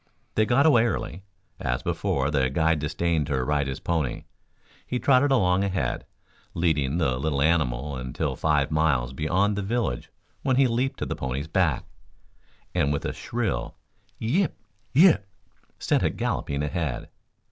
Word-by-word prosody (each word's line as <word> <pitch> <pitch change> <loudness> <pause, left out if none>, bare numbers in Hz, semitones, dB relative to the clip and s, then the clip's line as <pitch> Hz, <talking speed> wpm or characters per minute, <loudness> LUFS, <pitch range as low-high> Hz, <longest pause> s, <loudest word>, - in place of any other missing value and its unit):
They 110 0 +2
got 135 +4 +4
away 120 -7 +5
early. 110 -6 -3 0.4
As - - -2
before, 70 +1 0
the 65 -3 +2
guide 80 +3 +2
disdained 80 0 0
to 65 -3 0
ride 70 0 0
his 65 - -4
pony. 80 -7 -1 0.6
He 125 - -1
trotted 135 +2 +4
along 95 -7 +3
ahead, 95 -11 -2 0.5
leading 80 -4 +1
the 65 -7 +1
little 70 0 -1
animal 70 -3 +1
until 65 -1 -3
some - - -19
five 75 -2 +2
miles 75 -6 +1
beyond 90 +9 +1
the 100 - -2
village 100 - -2 0.3
when 130 -2 +1
he 135 +1 +5
leaped 130 +3 0
to - - -3
the - - -3
pony's 65 +3 -3
back, 80 -6 +1 0.9
and 80 -6 +2
with 70 - -2
a - - -2
shrill - - -3 0.4
"Yip, 155 - 0 0.4
yip!" 145 - +5 0.5
sent - - +1
it - - 0
galloping 70 0 -1
ahead. 75 -3 -2
80 Hz, 155 wpm, -26 LUFS, 70-105 Hz, 0.9 s, away